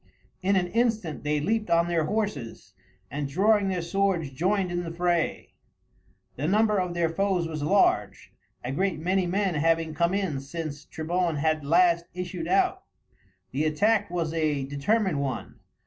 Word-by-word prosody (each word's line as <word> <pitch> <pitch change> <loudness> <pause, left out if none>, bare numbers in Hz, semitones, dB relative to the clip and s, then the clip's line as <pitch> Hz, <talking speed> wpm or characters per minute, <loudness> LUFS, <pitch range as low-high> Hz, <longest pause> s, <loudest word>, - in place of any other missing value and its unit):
In 195 +1 +2
an 185 -2 +2
instant 220 -8 0
they 150 0 0
leaped 215 +6 -1
on 170 0 +3
their 170 -2 +1
horses, 150 - -3 0.4
and 140 0 -3
drawing 200 +5 +3
their 180 -3 -2
swords 180 -4 0
joined 185 +6 0
in 175 0 -1
the 165 - -5
fray. 170 0 -1 0.9
The 145 +4 -1
number 210 +2 +3
of 180 -1 -2
their 170 -1 +2
foes 185 -1 0
was 155 -2 -5
large, 150 - +1 0.3
a 125 - -3
great 190 +7 0
many 180 +3 0
men 195 +1 0
having 165 +1 +1
come 170 +4 +1
in 185 -9 -1
since 145 +1 -6
Trebon 170 +1 -1
had 155 +1 0
last 170 +2 +3
issued 180 - -4
out. 380 0 +2 0.7
The 150 +3 0
attack 205 +7 +2
was 170 -2 -2
a 150 -4 0
determined 150 +5 0
one. 135 -2 -4
170 Hz, 160 wpm, -26 LUFS, 155-195 Hz, 0.9 s, on